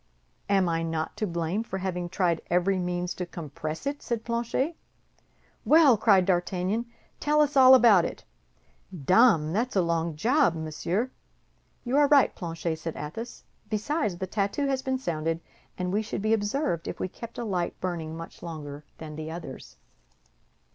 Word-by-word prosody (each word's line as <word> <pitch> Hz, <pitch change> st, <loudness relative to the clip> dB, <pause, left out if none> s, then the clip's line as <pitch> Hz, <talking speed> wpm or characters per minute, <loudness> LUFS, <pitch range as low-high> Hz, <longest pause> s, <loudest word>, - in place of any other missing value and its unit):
"I 200 Hz, -, +4 dB
am 165 Hz, -3 st, +1 dB
not 160 Hz, -1 st, -3 dB
to 215 Hz, -, -1 dB
blame 170 Hz, +3 st, -1 dB
for 190 Hz, -4 st, -5 dB
having 180 Hz, -2 st, -3 dB
tried 175 Hz, -3 st, 0 dB
every 180 Hz, +2 st, +2 dB
means 180 Hz, 0 st, -2 dB
to 180 Hz, -, -4 dB
compress 155 Hz, -, -6 dB
it," 285 Hz, +1 st, -2 dB
said 235 Hz, -2 st, -3 dB
Planchet. 235 Hz, +7 st, -1 dB, 0.9 s
"Well!" 305 Hz, -6 st, +6 dB
cried 200 Hz, -3 st, +4 dB
D'Artagnan, 185 Hz, +5 st, 0 dB, 0.3 s
"tell 300 Hz, +1 st, +2 dB
us 295 Hz, -1 st, +3 dB
all 260 Hz, -1 st, +9 dB
about 225 Hz, -8 st, +6 dB
it." -, -, -5 dB, 0.7 s
"Dame, 175 Hz, -, +4 dB
that's 235 Hz, +4 st, -1 dB
a 190 Hz, -, +4 dB
long 170 Hz, -1 st, -1 dB
job, 240 Hz, -, +3 dB
monsieur." 165 Hz, +9 st, -2 dB, 0.7 s
"You 260 Hz, +2 st, 0 dB
are 290 Hz, -1 st, +6 dB
right, 280 Hz, -2 st, +5 dB
Planchet," 165 Hz, -2 st, -4 dB
said 165 Hz, 0 st, -5 dB
Athos; 225 Hz, +11 st, -7 dB, 0.3 s
"besides, 215 Hz, -, -1 dB
the 190 Hz, -, -3 dB
tattoo 200 Hz, +8 st, -1 dB
has 270 Hz, -1 st, 0 dB
been 265 Hz, 0 st, -1 dB
sounded, 165 Hz, -8 st, -2 dB, 0.4 s
and 180 Hz, 0 st, -2 dB
we 210 Hz, -, +2 dB
should 210 Hz, -2 st, -4 dB
be 215 Hz, +1 st, +3 dB
observed 210 Hz, -, -1 dB
if -, -, -5 dB
we -, -, -1 dB
kept 230 Hz, +5 st, -10 dB
a 240 Hz, -, -3 dB
light 180 Hz, -5 st, -2 dB
burning 165 Hz, -3 st, -4 dB
much 165 Hz, -, -10 dB
longer 150 Hz, -3 st, -7 dB
than 155 Hz, -1 st, -8 dB
the 155 Hz, 0 st, -6 dB
others." 135 Hz, -, -8 dB
185 Hz, 165 wpm, -27 LUFS, 165-235 Hz, 0.9 s, all